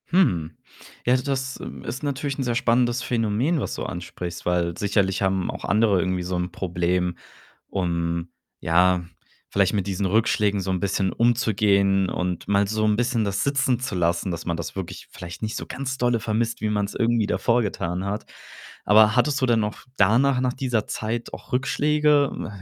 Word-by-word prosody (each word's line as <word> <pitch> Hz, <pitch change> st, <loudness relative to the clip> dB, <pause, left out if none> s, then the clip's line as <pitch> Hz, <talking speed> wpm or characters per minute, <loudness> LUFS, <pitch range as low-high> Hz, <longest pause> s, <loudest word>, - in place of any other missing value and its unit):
Hm. 90 Hz, -, +2 dB, 0.5 s
Ja, 125 Hz, -, +4 dB
das, 130 Hz, 0 st, -2 dB
äh, -, -, -6 dB, 0.2 s
ist 135 Hz, -, -5 dB
natürlich 140 Hz, -1 st, -2 dB
'n 135 Hz, -, -1 dB
sehr 120 Hz, -2 st, -1 dB
spannendes 120 Hz, +1 st, +2 dB
Phänomen, 120 Hz, +7 st, 0 dB
was -, -, -3 dB
du -, -, -4 dB
ansprichst, 90 Hz, 0 st, -6 dB
weil 85 Hz, -1 st, 0 dB
sicherlich 100 Hz, -2 st, +1 dB
haben 95 Hz, -2 st, +1 dB
auch -, -, -8 dB
andere 105 Hz, -2 st, +3 dB
irgendwie 90 Hz, 0 st, -1 dB
so 90 Hz, +1 st, -3 dB
'n 90 Hz, 0 st, -2 dB
Problem, 90 Hz, -1 st, -1 dB, 0.5 s
um 85 Hz, -2 st, -2 dB, 0.3 s
ja, 90 Hz, +1 st, +3 dB, 0.4 s
vielleicht 100 Hz, 0 st, +2 dB
mit 100 Hz, -2 st, -1 dB
diesen 95 Hz, 0 st, -1 dB
Rückschlägen 105 Hz, 0 st, +2 dB
so 95 Hz, 0 st, -2 dB
'n 95 Hz, -, 0 dB
bisschen 95 Hz, 0 st, 0 dB
umzugehen 100 Hz, -5 st, +2 dB
und 90 Hz, -1 st, -3 dB
mal 100 Hz, 0 st, +3 dB
so 110 Hz, +1 st, -1 dB
'n 105 Hz, -1 st, +3 dB
bisschen 120 Hz, 0 st, +1 dB
das 100 Hz, 0 st, -1 dB
sitzen 135 Hz, -3 st, +1 dB
zu 125 Hz, -6 st, -3 dB
lassen, 85 Hz, +2 st, 0 dB
dass 85 Hz, -1 st, -5 dB
man 85 Hz, -1 st, -1 dB
das 85 Hz, -, -6 dB
wirklich 95 Hz, -3 st, -6 dB
vielleicht 85 Hz, -2 st, -9 dB
nicht 110 Hz, 0 st, -3 dB
so -, -, -5 dB
ganz 130 Hz, 0 st, -4 dB
dolle 120 Hz, -2 st, +1 dB
vermisst, 115 Hz, +1 st, -1 dB
wie 110 Hz, -, 0 dB
man's 105 Hz, -1 st, -1 dB
irgendwie 115 Hz, -2 st, +2 dB
davor 120 Hz, +3 st, +2 dB
getan 90 Hz, -4 st, -2 dB
hat. 100 Hz, +2 st, -3 dB, 0.6 s
Aber 110 Hz, +1 st, +6 dB
hattest 145 Hz, -2 st, +2 dB
du -, -, +4 dB
denn 120 Hz, -2 st, +3 dB
noch 105 Hz, -1 st, -3 dB
danach 125 Hz, +7 st, +4 dB
nach 125 Hz, -1 st, 0 dB
dieser 125 Hz, -5 st, -1 dB
Zeit 115 Hz, +2 st, -4 dB
auch -, -, -10 dB
Rückschläge? 145 Hz, +2 st, +2 dB, 0.2 s
Ach, 100 Hz, -2 st, -10 dB
105 Hz, 185 wpm, -24 LUFS, 90-120 Hz, 0.6 s, Aber